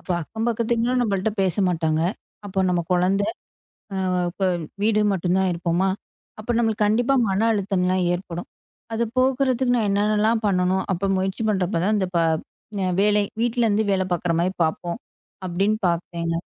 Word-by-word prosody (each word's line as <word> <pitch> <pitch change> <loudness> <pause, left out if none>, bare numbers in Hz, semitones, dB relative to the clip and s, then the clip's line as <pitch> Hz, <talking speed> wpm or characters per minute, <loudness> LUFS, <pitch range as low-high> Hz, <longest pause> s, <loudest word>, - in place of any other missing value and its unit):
அப்ப - - -12
அக்கம் 220 +8 -4
பக்கத்து 230 0 -1
வீட்ல 235 +2 +1
நம்மள்ட்ட 205 -2 0
பேச 190 -1 +1
மாட்டாங்க. 160 -2 0 0.4
அப்போ 190 -1 -1
நம்ம 175 -1 +1
குழந்தை, 190 +3 +2 0.7
அ - - -3 0.4
இப்ப 195 - -2 0.4
வீடு 215 0 +3
மட்டும்தான் 185 +1 +1
இருப்போமா? 170 +2 0 0.5
அப்போ 215 +3 -3
நம்மளுக்கு 220 -2 +1
கண்டிப்பா 235 +5 +2 0.2
மன 195 +2 +1
அழுத்தம்லாம் 185 -2 0
ஏற்படும். 175 -1 -5 0.5
அத 230 - 0
போக்குறதுக்கு 260 -1 +2
நான் 215 -3 +1
என்னனெல்லாம் 215 +2 +2
பண்ணணும்? 185 -1 +1
அப்போ 190 +1 -1
முயற்சி 190 +3 -2
பண்றப்போ 185 -3 0
தான் 215 - +2
இந்த 190 -2 0
பா 170 - +3 0.8
வேலை 210 0 +3 0.2
வீட்டுல 240 0 +1
இருந்து 215 +1 +2
வேலை 190 -1 +2
பாக்குற 175 0 0
மாதிரி 180 +2 0
பாப்போம் 170 +3 -2 0.5
அப்படின்னு 195 +4 +1
பாத்தேங்க. 170 -1 -2
195 Hz, 150 wpm, -23 LUFS, 180-220 Hz, 0.8 s, வீடு